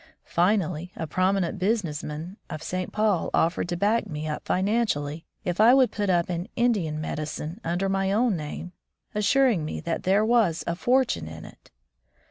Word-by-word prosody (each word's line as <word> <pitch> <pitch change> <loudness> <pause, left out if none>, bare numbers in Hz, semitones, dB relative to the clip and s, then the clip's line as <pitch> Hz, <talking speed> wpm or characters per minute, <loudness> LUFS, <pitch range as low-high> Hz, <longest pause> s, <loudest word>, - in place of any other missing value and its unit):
Finally, 180 -2 +1
a 160 - -3
prominent 185 +2 0
business 185 -6 0
man 155 +5 -6
of 155 - -6
St. 185 +1 -3
Paul 210 -5 +1
offered 170 +1 +1
to 175 - -1
back 210 +5 +1
me 155 0 -5
up 150 - -4
financially 185 -7 0 0.2
if 180 +2 0
I 235 +4 +8
would 260 -2 +4
put 205 -2 -1
up 175 -2 +2
an 175 0 -3
^^ - - -16
Indian 200 -11 +1
medicine" 155 +5 -4
under 175 +3 -1
my 195 0 0
own 225 0 +2
name, 160 +2 -6 0.4
assuring 210 - +3
me 155 - -4
that 170 - -2
there 200 +3 +3
was 215 -9 +2
"a 170 - -1
fortune 240 - +1
in 80 0 -9
it." - - -15
180 Hz, 175 wpm, -26 LUFS, 160-210 Hz, 0.4 s, I